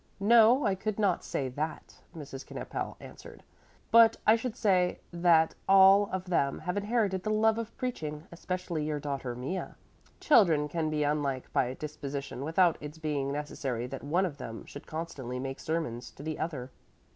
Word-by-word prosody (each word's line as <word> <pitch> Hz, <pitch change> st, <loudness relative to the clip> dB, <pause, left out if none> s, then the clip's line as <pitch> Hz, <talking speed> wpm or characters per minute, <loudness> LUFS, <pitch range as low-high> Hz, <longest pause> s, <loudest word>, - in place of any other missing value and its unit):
"No, 230 Hz, +5 st, +6 dB
I 200 Hz, -, +3 dB
could 200 Hz, +2 st, -3 dB
not 200 Hz, -5 st, +1 dB
say 135 Hz, -, -2 dB
that," 150 Hz, +5 st, -5 dB, 0.2 s
Mrs. 135 Hz, -3 st, -8 dB
Knippel -, -, -5 dB
answered. -, -, -12 dB, 0.5 s
"But 230 Hz, 0 st, +7 dB
I 215 Hz, -, +7 dB
should 230 Hz, 0 st, -4 dB
say 185 Hz, -5 st, +2 dB
that 170 Hz, -2 st, +4 dB, 0.2 s
all 195 Hz, +1 st, +7 dB
of 190 Hz, 0 st, -3 dB
them 155 Hz, -7 st, +1 dB
have 180 Hz, -, -4 dB
inherited 205 Hz, -2 st, 0 dB
the 215 Hz, -, -3 dB
love 220 Hz, +1 st, +3 dB
of 230 Hz, -1 st, -7 dB
preaching, 155 Hz, -, -4 dB
especially 175 Hz, -2 st, -4 dB
your 150 Hz, -1 st, -2 dB
daughter 140 Hz, -4 st, -4 dB
Mea. 135 Hz, +10 st, -4 dB, 0.4 s
Children 170 Hz, -, +4 dB
can 160 Hz, 0 st, -1 dB
be 150 Hz, -1 st, 0 dB
unlike 145 Hz, -3 st, -1 dB
by 125 Hz, +1 st, +1 dB
disposition 140 Hz, -3 st, -6 dB
without 165 Hz, +2 st, +2 dB
its 150 Hz, +1 st, -8 dB
being 145 Hz, -3 st, -2 dB
necessary 140 Hz, -4 st, -3 dB
that 135 Hz, +2 st, -7 dB
one 170 Hz, +7 st, +1 dB
of 145 Hz, -6 st, -6 dB
them 115 Hz, -3 st, -7 dB
should 145 Hz, -, -11 dB
constantly 145 Hz, -6 st, -5 dB
make 135 Hz, +1 st, -5 dB
sermons 155 Hz, -7 st, -3 dB
to 140 Hz, -, -11 dB
the 155 Hz, 0 st, -4 dB
other." 135 Hz, -6 st, -4 dB
160 Hz, 170 wpm, -30 LUFS, 140-195 Hz, 0.5 s, But